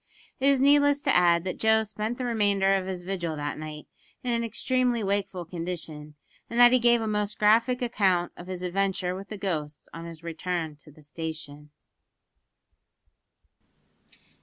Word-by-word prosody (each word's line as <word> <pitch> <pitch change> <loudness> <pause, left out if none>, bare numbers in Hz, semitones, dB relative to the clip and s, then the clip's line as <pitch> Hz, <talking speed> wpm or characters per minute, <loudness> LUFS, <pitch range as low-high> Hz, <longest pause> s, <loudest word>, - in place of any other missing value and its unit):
It 270 - +2
is 280 -1 +4
needless 285 +1 +4
to 275 - +2
add 170 -1 +4
that 185 - -4
Joe 220 0 +4
spent 215 +2 -4
the 255 - -3
remainder 205 -4 +2
of 190 -1 0
his 185 -2 -5
vigil 175 -4 -3
that 145 0 -4
night 155 -1 -7 0.4
in 250 - -1
an 235 0 0
extremely 245 0 0
wakeful 195 -2 -2
condition, 165 -3 -6 0.3
and 235 - -2
that 240 0 +9
he 255 - +5
gave 240 -1 +4
a - - -2
most 210 -1 -1
graphic 230 +4 +3
account 190 -7 +1
of 175 - -11
his 185 -1 -6
adventure 185 0 -1
with 195 +2 -8
the 215 - -6
ghosts 155 -7 -4
on 165 +2 -7
his 165 -1 -10
return 170 -1 -3
to 150 - -18
the 150 +1 -18
station! 150 -1 -7
190 Hz, 165 wpm, -27 LUFS, 170-225 Hz, 0.4 s, that